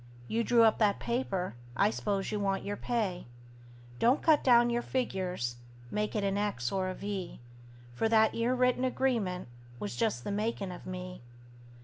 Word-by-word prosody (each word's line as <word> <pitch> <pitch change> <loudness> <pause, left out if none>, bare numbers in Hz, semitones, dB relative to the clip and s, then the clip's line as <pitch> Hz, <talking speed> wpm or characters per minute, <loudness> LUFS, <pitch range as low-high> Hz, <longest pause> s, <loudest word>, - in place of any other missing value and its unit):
You 230 +1 0
drew 235 0 +5
up 220 -1 +4
that 210 -2 +3
paper 200 -7 -2 0.2
I 205 +2 +4
s'pose 200 -3 -2
you 210 - -1
want 195 -1 0
your 205 0 -2
pay. 205 - -2 0.7
Don't 250 +5 +3
cut 310 -3 +5
down 240 -2 +5
your 240 0 +1
figures; 185 - -2 0.3
make 210 +1 -1
it 210 - 0
an 200 0 0
X 160 -13 -1
or 190 -1 0
a 185 - -4
V; 200 -3 -5 0.5
For 225 - 0
that 220 -1 +4
'ere 235 +2 +1
written 250 0 +2
agreement 235 - 0 0.3
was 105 0 -5
just 120 0 0
the - - -3
makin' 205 -2 -2
of 180 - -9
me. 180 0 -6
205 Hz, 170 wpm, -31 LUFS, 185-235 Hz, 0.7 s, drew